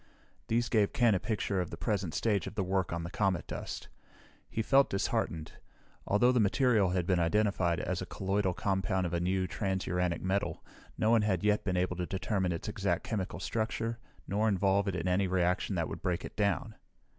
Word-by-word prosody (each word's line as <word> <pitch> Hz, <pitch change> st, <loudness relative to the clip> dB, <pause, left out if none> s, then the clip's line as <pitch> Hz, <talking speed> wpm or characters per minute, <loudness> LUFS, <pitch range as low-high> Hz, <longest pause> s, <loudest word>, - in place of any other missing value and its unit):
These 115 Hz, +1 st, +1 dB
gave 105 Hz, -4 st, +2 dB
Ken 120 Hz, -3 st, +4 dB
a 95 Hz, -, +1 dB
picture 105 Hz, -3 st, -1 dB
of 90 Hz, -, -4 dB
the 80 Hz, -, -7 dB
present 95 Hz, -2 st, -1 dB
stage 105 Hz, -6 st, +1 dB
of -, -, -7 dB
the 100 Hz, -, 0 dB
work 95 Hz, 0 st, 0 dB
on 85 Hz, 0 st, -2 dB
the 85 Hz, -, -6 dB
comet 95 Hz, -8 st, 0 dB
dust. -, -, -6 dB, 0.6 s
He 110 Hz, -, -2 dB
felt 135 Hz, +4 st, +4 dB
disheartened. 80 Hz, -4 st, -1 dB, 0.6 s
Although 120 Hz, +5 st, +4 dB
the 125 Hz, -, +2 dB
material 110 Hz, -2 st, +3 dB
had 90 Hz, -1 st, 0 dB
been 90 Hz, -1 st, +2 dB
identified 90 Hz, -1 st, +2 dB
as -, -, -2 dB
a -, -, -5 dB
colloidal 95 Hz, -1 st, -1 dB
compound 95 Hz, -1 st, 0 dB
of 85 Hz, -, -3 dB
a 85 Hz, -, +1 dB
new, 95 Hz, +2 st, 0 dB
transuranic 90 Hz, -3 st, -1 dB
metal, 95 Hz, +2 st, -1 dB, 0.3 s
no 110 Hz, -, +2 dB
one 115 Hz, -1 st, +5 dB
had 95 Hz, -4 st, 0 dB
yet 105 Hz, 0 st, +2 dB
been 90 Hz, -2 st, -1 dB
able 90 Hz, 0 st, 0 dB
to 90 Hz, -1 st, -2 dB
determine 95 Hz, -1 st, -1 dB
its 85 Hz, -, -4 dB
exact 100 Hz, -5 st, -1 dB
chemical 100 Hz, -4 st, -3 dB
structure 115 Hz, +1 st, -2 dB, 0.3 s
nor 105 Hz, +3 st, +1 dB
involve 100 Hz, 0 st, +2 dB
it 95 Hz, -, -1 dB
in 90 Hz, -, -2 dB
any 95 Hz, +2 st, +2 dB
reaction 90 Hz, -1 st, +1 dB
that -, -, 0 dB
would -, -, -7 dB
break 90 Hz, -2 st, -1 dB
it -, -, -9 dB
down. 105 Hz, +1 st, 0 dB
95 Hz, 200 wpm, -31 LUFS, 90-105 Hz, 0.6 s, one